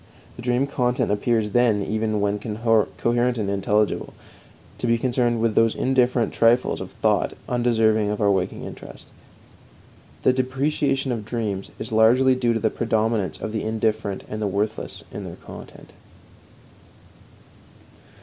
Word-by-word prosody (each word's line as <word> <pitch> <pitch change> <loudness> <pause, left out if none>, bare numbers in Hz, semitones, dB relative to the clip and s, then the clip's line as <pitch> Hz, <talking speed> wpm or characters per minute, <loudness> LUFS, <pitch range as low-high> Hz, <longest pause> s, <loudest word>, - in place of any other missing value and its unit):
The - - -9
dream 125 +2 +1
content 125 -3 0
appears, 105 0 0
then, 115 -3 +3
even 110 +1 -1
when 100 0 0
coherent 115 +2 +1
and 105 -3 -1
intelligible, 100 +2 0 0.6
to - - -1
be 115 0 +3
concerned 120 -1 0
with 115 -1 +1
those 115 0 +3
indifferent 125 -2 +1
trifles 115 +2 +2
of - - -6
thought - - 0
undeserving 110 -3 +2
of 105 - -2
our 100 -1 +3
waking 95 -2 -1
interest. - - -10 1.1
The 130 - +4
depreciation 135 +1 0
of 115 -3 -3
dreams 105 -4 -3
is - - -6
largely 120 +4 +5
due 120 -2 +1
to - - 0
the 110 0 0
predominance 110 -6 -1
of 110 - -4
the 110 -1 -2
indifferent 110 -2 -1
and 105 0 -5
the 105 - 0
worthless 105 +3 -3
in - - -6
their - - -7
content. - - -12
115 Hz, 140 wpm, -23 LUFS, 105-125 Hz, 1.1 s, largely